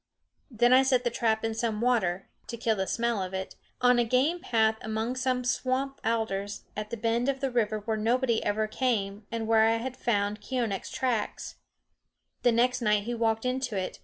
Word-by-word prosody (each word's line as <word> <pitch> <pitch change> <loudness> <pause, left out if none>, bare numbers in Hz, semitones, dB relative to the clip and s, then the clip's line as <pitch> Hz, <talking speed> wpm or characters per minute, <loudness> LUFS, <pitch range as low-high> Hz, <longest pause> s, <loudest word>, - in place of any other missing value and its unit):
Then 240 0 +3
I 260 - +7
set 260 -2 +2
the 240 - 0
trap 225 -1 0
in 225 - -1
some 225 -1 -2
water 215 -7 +1 0.2
(to 235 - -5
kill 225 -1 +1
the 190 -1 -2
smell 235 -3 0
of 185 0 -4
it) 190 0 -4 0.3
on 245 0 +5
a - - +4
game 260 +9 +1
path 220 -7 +2
among 220 +3 -2
some 255 -1 0
swamp 265 +2 -1
alders, 205 -3 -2
at 210 +1 -5
a 235 - -3
bend 230 +3 0
of 270 -1 -1
the 270 -1 -1
river 215 -3 0
where 220 +1 -2
nobody 235 +2 +1
ever 215 +1 0
came 210 -3 -2
and 230 -1 -2
where 220 0 +5
I 225 0 +2
had 250 +2 -5
found 205 -4 -1
Keeonekh's 235 -7 -2
tracks. 245 -5 -2 0.8
The 245 - +4
next 245 +2 +2
night 210 -2 +2
he 240 +3 -3
walked 225 0 0
into 250 -4 -1
it. 185 -1 -4
230 Hz, 195 wpm, -28 LUFS, 215-250 Hz, 0.8 s, I